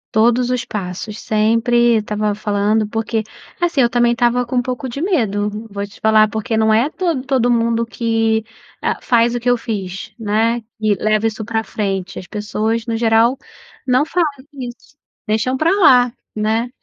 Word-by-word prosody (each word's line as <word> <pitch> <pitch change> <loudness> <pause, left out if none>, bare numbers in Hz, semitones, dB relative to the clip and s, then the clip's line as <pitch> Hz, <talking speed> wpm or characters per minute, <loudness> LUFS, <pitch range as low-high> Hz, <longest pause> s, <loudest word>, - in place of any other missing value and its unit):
Todos 240 +3 +3
os 250 0 0
passos, 205 +1 -5
sempre 230 +2 +2
estava 210 0 -1
falando, 210 +1 0
porque, 225 +1 -2 0.4
assim, 340 -6 +1
eu 235 - +4
também 240 0 +3
estava 240 +1 +1
com 250 - -5
um 245 - +3
pouco 255 +1 -4
de 265 +4 -5
medo 215 - -1
vou 200 0 -4
te 200 - -16
falar 215 -1 +4
porque 220 +1 -2
não 220 0 +3
é 235 +6 +3
todo 335 -6 -1
todo 255 -3 +2
mundo 230 0 +1
que, 225 -1 0 0.4
ah, - - -1
faz 235 0 +2
o 240 - -2
que 245 - +1
eu 245 - +3
fiz, 205 -2 -5
né, 225 +2 0 0.2
que 215 -2 +2
leva 215 +3 +1
isso 220 0 -4
pra 225 0 -2
frente. 195 -2 -3
As 180 - -8
pessoas 220 +2 -2
no 230 -1 -2
geral 230 +2 +3 0.5
não 255 +2 +3
falam 335 -1 +1 0.2
isso, 255 +1 -9 0.3
deixam 220 +5 0
pra 320 +3 +2
lá, 245 -5 +6 0.2
né, 220 +3 0
225 Hz, 175 wpm, -18 LUFS, 215-245 Hz, 0.5 s, lá